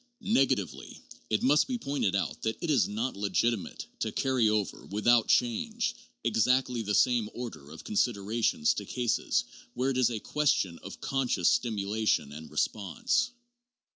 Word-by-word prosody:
Negatively, 105 - 0 0.3
it 110 - 0
must 145 +3 +4
be 255 -2 -2
pointed 140 - -1
out 100 - -2
that 110 0 -2
it 170 - -1
is 135 -6 +3
not 115 +5 -2
legitimate 100 +2 -1
to - - -1
carry 130 -5 +2
over, 105 -2 -1
without 110 +3 +3
change, 115 - +1 0.3
exactly 125 +1 +2
the 105 -1 -1
same 120 -4 +3
order 115 - -7
of 80 +1 -10
considerations 115 - +1
to - - -5
cases 120 -3 0 0.3
where 130 +2 +1
it 130 - -2
is 125 -2 +4
a 115 -3 -3
question 105 - 0
of - - -10
conscious 125 -10 +1
stimulation 105 - 0
and 75 +1 -9
response. 100 - 0
115 Hz, 145 wpm, -29 LUFS, 100-130 Hz, 0.3 s, must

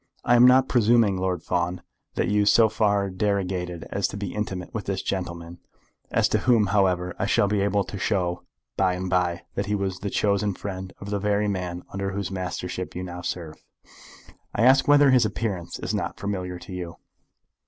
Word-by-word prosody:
"I 120 - +5
am 120 +1 +8
not 130 +1 +5
presuming, 115 -4 +3
Lord 90 -3 -2
Fawn, 90 0 -1 0.3
that - - 0
you 105 0 +2
so 110 +1 +6
far 100 -2 +1
derogated 95 -3 -2
as 100 - 0
to 100 - -7
be 100 -2 -4
intimate 95 -4 -4
with 110 - -4
this 95 -1 -2
gentleman, 85 -2 -4 0.5
as - - +2
to - - +2
whom, 120 -4 +3
however, 90 -3 +2
I 100 - 0
shall 100 - +3
be 100 0 +1
able 100 0 +1
to 100 +1 -7
show 90 -3 0 0.3
by 95 -1 +2
and 90 0 -4
by 90 -2 +1
that 100 0 -2
he 105 - 0
was 95 -2 -2
the 100 - -3
chosen 100 0 +1
friend 95 -1 -6
of 100 +1 -7
the 100 - 0
very 105 +1 +1
man 90 -3 -3
under 100 0 -3
whose 100 -1 -3
mastership 90 -1 -4
you 90 - -4
now 90 -1 -6
serve. 85 -3 -6 0.9
I - - +2
ask 130 +2 +5
whether 145 -1 +6
his 125 -2 +5
appearance 100 -5 -3
is - - -4
not - - -3
familiar 90 -3 -3
to 95 +2 -10
you?" 90 -2 -6
95 Hz, 195 wpm, -25 LUFS, 90-105 Hz, 0.9 s, am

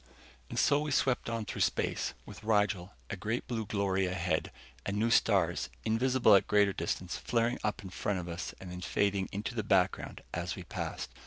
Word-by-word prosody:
And - - -6
so 145 +1 +4
we 150 0 -2
swept 130 -3 +1
on 115 -2 -2
through - - -4
space, - - 0
with - - -11
Rigel 105 -3 +1 0.2
a - - -1
great 110 +5 -2
blue 115 -4 -2
glory 95 -2 +1
ahead, 90 -3 -1 0.3
and 100 +1 -2
new 115 +2 +2
stars, 95 -7 +3 0.2
invisible 125 0 +4
at 100 - +6
greater 100 -1 +4
distances, 85 +1 -3
flaring 120 0 +1
up 105 -1 -1
in 95 - -8
front 100 +1 -1
of 90 -1 -4
us 85 0 -5
and 95 -1 -8
then 90 0 -6
fading 100 0 +1
into 105 +4 -3
the 115 - -1
background 95 -3 +1
as - - -2
we - - -7
passed. - - -5
100 Hz, 190 wpm, -32 LUFS, 95-115 Hz, 0.3 s, at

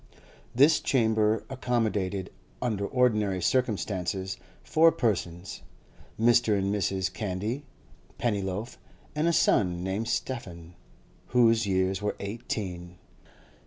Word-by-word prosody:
This 145 +5 +6
chamber 110 -3 +2
accommodated, 110 -7 -1 0.3
under 105 -5 -1
ordinary 105 -7 +2
circumstances, 95 -4 -1 0.3
four 165 +1 +5
persons: 90 - -2 0.6
Mr. 115 -2 +4
and 100 +1 0
Mrs. 95 -2 -1
Candy, 105 +8 -3 0.5
Pennyloaf, 105 0 -2 0.3
and 150 +2 0
a - - +4
son 90 - +2
named 95 +4 -2
Stephen, 90 -9 -4 0.5
whose 115 -3 +3
years 95 0 +1
were 105 - -1
eighteen. 95 -5 -5
105 Hz, 95 wpm, -28 LUFS, 95-120 Hz, 0.6 s, This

